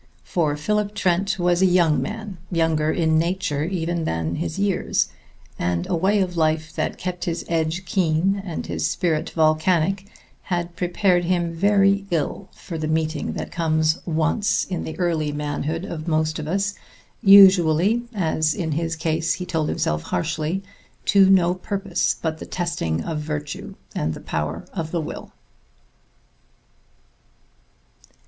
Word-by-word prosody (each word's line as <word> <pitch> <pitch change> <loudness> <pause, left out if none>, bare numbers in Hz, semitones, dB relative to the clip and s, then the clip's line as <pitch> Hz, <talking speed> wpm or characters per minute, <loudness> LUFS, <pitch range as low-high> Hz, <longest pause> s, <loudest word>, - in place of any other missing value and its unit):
For 155 -4 0
Philip 210 +6 -1
Trent 195 +2 +1
was 175 0 +2
a 190 - +6
young 175 -4 +3
man, 210 -3 -5
younger 160 -2 +1
in 160 -2 +2
nature 170 -4 -1
even 170 -1 -2
than 80 - -2
his 155 - -3
years, 200 -2 +1 0.5
and 85 0 0
a - - -1
way 195 +4 +2
of 180 -2 -2
life 155 -1 0
that - - -2
kept 180 -1 -4
his 170 0 -3
edge 165 +2 -1
keen 185 +2 +1
and 175 -5 -5
his - - -1
spirit 160 -2 0
volcanic 165 +4 +2 0.3
had 175 -2 -3
prepared 180 0 +1
him 175 -1 0
very 200 +2 +3
ill 170 +3 -2
for 165 -3 -7
the 155 - -2
meeting 155 -1 -1
that - - -5
comes 155 -1 +1
once 165 +6 +1
in 180 -2 -4
the 160 - -6
early 165 -4 0
manhood 150 +3 -3
of 160 -2 -6
most 155 0 0
of 150 - -5
us, 200 +4 0 0.5
usually 195 +1 +7
as 160 -6 0
in 165 -5 -2
his 165 +2 -1
case, 160 0 0
he 180 - -5
told 160 -3 -1
himself 75 0 -1
harshly 155 - -2 0.4
to 195 -2 +5
no 180 -2 +5
purpose 190 0 -1
but 160 -1 -3
the - - -8
testing 85 - -2
of 160 -2 -3
virtue 150 -1 -5 0.2
and 80 +1 -1
the - - -8
power 75 +2 -3
of 165 -4 -3
the 170 - -1
will. 150 - -7
170 Hz, 150 wpm, -23 LUFS, 155-185 Hz, 0.5 s, usually